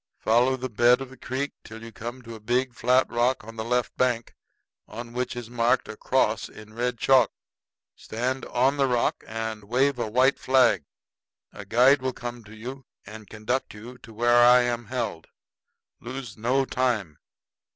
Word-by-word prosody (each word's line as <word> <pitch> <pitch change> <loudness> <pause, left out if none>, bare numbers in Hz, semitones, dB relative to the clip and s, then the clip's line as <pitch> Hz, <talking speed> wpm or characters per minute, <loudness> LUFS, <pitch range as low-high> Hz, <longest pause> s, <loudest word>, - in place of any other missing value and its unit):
Follow 125 +4 +2
the 130 0 -4
bed 120 +2 +4
of 135 -1 -7
the - - -12
creek 135 +2 -4
till 110 +1 -11
you 115 - -9
come 120 +3 -8
to 115 0 -9
a 110 - -9
big 125 +4 0
flat 125 +2 +2
rock 120 +1 0
on 115 +1 -11
the 110 - -4
left 125 +1 -1
bank, 120 -2 0 0.5
on 120 +2 -8
which 125 +1 -3
is 120 -2 -6
marked 120 +1 +1
a 110 - -7
cross 110 -3 0
in 110 0 -14
red 120 +1 -2
chalk. 130 -1 +4 0.6
Stand 125 +4 -3
on 135 +4 +1
the 135 -1 +3
rock 120 -2 0
and 110 -1 -5
wave 130 +4 +1
a 115 - -2
white 130 +5 +3
flag. 125 - +3 0.7
A 105 - -9
guide 130 +6 +4
will 130 0 -2
come 120 -1 -7
to 110 +1 -13
you 130 +4 -8 0.2
and 110 0 -11
conduct 110 +3 -3
you 120 +4 -11
to 115 - -14
where 120 +2 +4
I 125 +1 +7
am 120 -1 -2
held. 115 -8 -4 0.7
Lose 125 -2 -7
no 125 +5 +1
time. 115 - -1
120 Hz, 180 wpm, -25 LUFS, 115-130 Hz, 0.7 s, I